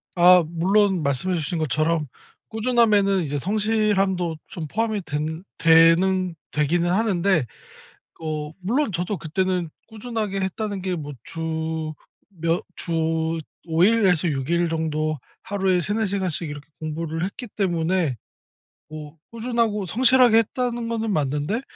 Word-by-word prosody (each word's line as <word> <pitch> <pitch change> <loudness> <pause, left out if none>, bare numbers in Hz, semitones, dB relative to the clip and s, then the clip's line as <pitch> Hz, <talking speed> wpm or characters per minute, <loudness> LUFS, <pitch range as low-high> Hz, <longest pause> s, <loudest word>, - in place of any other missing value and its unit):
아. 180 0 +7
물론 190 +2 +2
말씀해 140 +7 0
주신 170 +1 -2
것처럼 155 +1 0 0.4
꾸준함에는 215 -5 +3
이제 145 -1 -2
성실함도 195 -3 +1
좀 160 -3 -6
포함이 220 +4 -1
된 155 +3 -3
되는 165 +2 +4 0.2
되기는 170 +4 +1
하는데 190 - +2 0.8
어 155 -1 -4
물론 230 +6 0
저도 180 +4 -2
그때는 180 +2 -1 0.2
꾸준하게 220 -3 -3
했다는 195 +1 -3
게 185 -1 -1
뭐 145 -2 -6
주 160 -1 -3 0.5
몇 165 +1 +2
주 160 -1 -1 0.3
5 165 0 +1
일에서 190 -5 +4
6 135 -1 -2
일 170 0 +2
정도 155 -1 -1 0.3
하루에 190 -2 +1
3-4 210 +6 0
시간씩 185 -5 -1
이렇게 145 0 -9
공부를 160 +1 -3
했기 220 +6 -5
때문에 175 - 0 0.7
뭐 155 0 -9
'꾸준하고 230 -3 -1
성실하게 245 +2 +5
했다.'는 235 +1 0
거는 225 -1 -2
맞는데 150 - -1
180 Hz, 260 characters per minute, -23 LUFS, 160-205 Hz, 0.8 s, 아